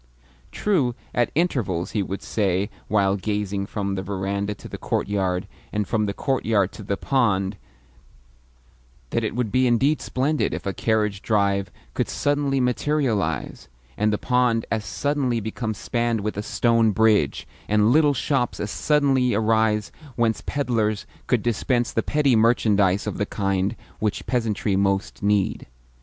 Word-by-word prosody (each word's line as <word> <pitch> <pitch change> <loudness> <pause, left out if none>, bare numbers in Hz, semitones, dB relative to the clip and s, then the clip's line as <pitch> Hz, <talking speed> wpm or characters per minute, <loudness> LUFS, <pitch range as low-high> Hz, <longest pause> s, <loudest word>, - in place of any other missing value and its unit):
True, 150 - +1 0.2
at 120 -1 +2
intervals 120 - 0
he 105 - 0
would 95 +1 -4
say, 100 -1 0 0.2
while 100 -2 +2
gazing 100 -1 -2
from 100 -2 -3
the 95 - -2
verandah 100 +1 -2
to - - -11
the - - -8
courtyard, 95 -2 -1 0.2
and 105 -2 -1
from 110 -2 0
the 100 - -2
courtyard 110 -7 +1
to - - -10
the 100 0 -2
pond, 105 -7 +1 1.6
that 115 - 0
it 110 - -2
would 120 -4 -1
be 130 0 +3
indeed 135 +6 +2
splendid 145 +4 0
if - - -7
a 100 - -1
carriage 105 -3 0
drive 100 -3 +1 0.2
could - - -1
suddenly 145 -1 0
materialise, 125 - -1 0.3
and 105 +1 +1
the 105 - +1
pond 125 -2 +1
as 110 -2 0
suddenly 140 -2 0
become 110 +1 -3
spanned 115 +1 -1
with 105 +1 -3
a 105 - -2
stone 115 +1 +2
bridge, 105 -9 +2 0.2
and 105 +1 +3
little 150 0 +4
shops 135 -3 0
as 105 - -3
suddenly 135 -5 +2
arise 110 -1 +2 0.2
whence 115 -2 +1
pedlars 115 -7 0 0.2
could 120 -4 +1
dispense 120 +1 0
the 115 - +1
petty 145 -2 +2
merchandise 105 -4 +3
of - - -4
the 105 - +1
kind 100 +1 -1 0.2
which 105 -1 -1
peasantry 110 -5 0
most 100 0 0
need. 100 -2 +1
110 Hz, 150 wpm, -23 LUFS, 100-125 Hz, 1.6 s, little